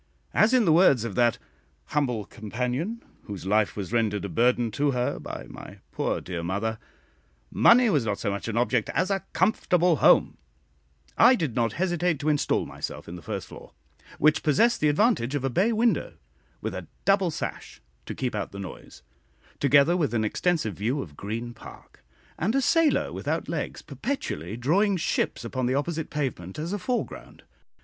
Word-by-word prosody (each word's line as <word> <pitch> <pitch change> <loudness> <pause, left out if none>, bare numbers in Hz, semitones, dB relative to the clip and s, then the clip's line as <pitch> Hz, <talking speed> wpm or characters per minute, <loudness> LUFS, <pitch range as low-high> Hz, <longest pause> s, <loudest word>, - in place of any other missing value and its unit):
As, 215 +2 +4
in 255 -4 +4
the 160 - +5
words 155 - +5
of 115 -4 -4
that 120 +2 +2 0.5
"humble 125 -8 0
companion," 125 - -4 0.2
whose 100 -4 -7
life 105 +2 +1
was 100 +2 -5
rendered 105 -4 0
a - - -4
burden 120 +2 +2
to 145 +6 0
her 125 -2 -1
by - - -7
my - - -11
poor - - -1
dear 90 -2 -5
mother, 105 +6 -2 0.7
"Money 245 +1 +6
was 150 - +2
not 105 -3 -1
so 100 - -2
much 100 +2 -4
an 115 0 -2
object 120 -2 +1
as 185 +3 +1
a 195 -1 -1
comfortable 180 -3 +2
home," - - +4 0.8
I 245 +3 +8
did 155 - -2
not 115 -2 +1
hesitate 175 -2 0
to 145 +2 -1
instal 150 -2 +1
myself - - -7
in 85 - -7
the 90 - -9
first - - -5
floor, - - -13 0.4
which 155 +1 +3
possessed 225 - +3
the 150 - +4
advantage 145 - +2
of 140 - -2
a 135 - 0
bay 195 - +2
window, 230 +1 +1 0.5
with - - -3
a - - -6 0.2
double 195 -2 +3
sash 155 - -6 0.3
to - - -5
keep 125 -2 -2
out 105 -2 -3
the 100 - -9
noise, 95 -8 -9 0.6
together 140 +4 +4
with 150 -9 0
an 110 - +1
extensive 155 - 0
view 120 +9 -1
of 75 -5 -13
Green 115 +7 -5
Park, - - -14 0.4
and 210 +9 0
a 275 - +3
sailor 330 0 +2
without - - -3
legs - - -4
perpetually 105 - -4
drawing 190 - +2
ships 155 - -1
upon 130 +1 -2
the 130 - +1
opposite 160 +2 -2
pavement, 125 - -4
as 165 +5 -3
a 205 - -2
foreground. 245 +6 -4
135 Hz, 180 wpm, -26 LUFS, 110-180 Hz, 0.8 s, I